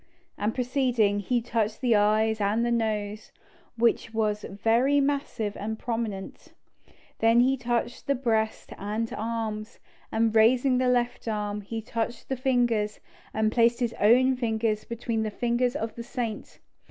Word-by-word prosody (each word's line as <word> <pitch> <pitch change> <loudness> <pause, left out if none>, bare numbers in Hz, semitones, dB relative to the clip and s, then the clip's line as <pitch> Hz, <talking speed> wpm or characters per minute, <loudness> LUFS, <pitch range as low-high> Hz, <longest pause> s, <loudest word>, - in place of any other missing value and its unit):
And 210 +2 -2
proceeding, 245 -5 +1
he 240 +3 0
touched 225 -2 -1
the 240 -3 +3
eyes 215 +1 +2
and 210 +4 +1
the 240 - 0
nose, 215 -2 -2 0.5
which 230 -1 +1
was 210 -1 0
very 230 +8 +2
massive 275 -7 -1
and 220 +2 -4
prominent. 225 -5 -5 0.7
Then 230 +1 +5
he 260 +2 +3
touched 240 -1 -2
the 280 - +2
breast 220 -4 -1
and 215 +3 -3
arms, 220 0 -4 0.3
and 225 0 +1
raising 250 +3 +4
the 255 -1 +2
left 245 -1 0
arm, 210 -1 -2
he 225 +2 -6
touched 230 +1 -4
the 265 - 0
fingers, 240 -5 +1 0.3
and 220 0 +1
placed 235 +1 +3
his 240 -2 0
own 255 +5 +5
fingers 220 -3 -1
between 230 -1 -3
the 220 - -1
fingers 240 +3 0
of 225 -6 -3
the 235 - -7
saint. 235 -2 -5
225 Hz, 150 wpm, -27 LUFS, 215-245 Hz, 0.7 s, Then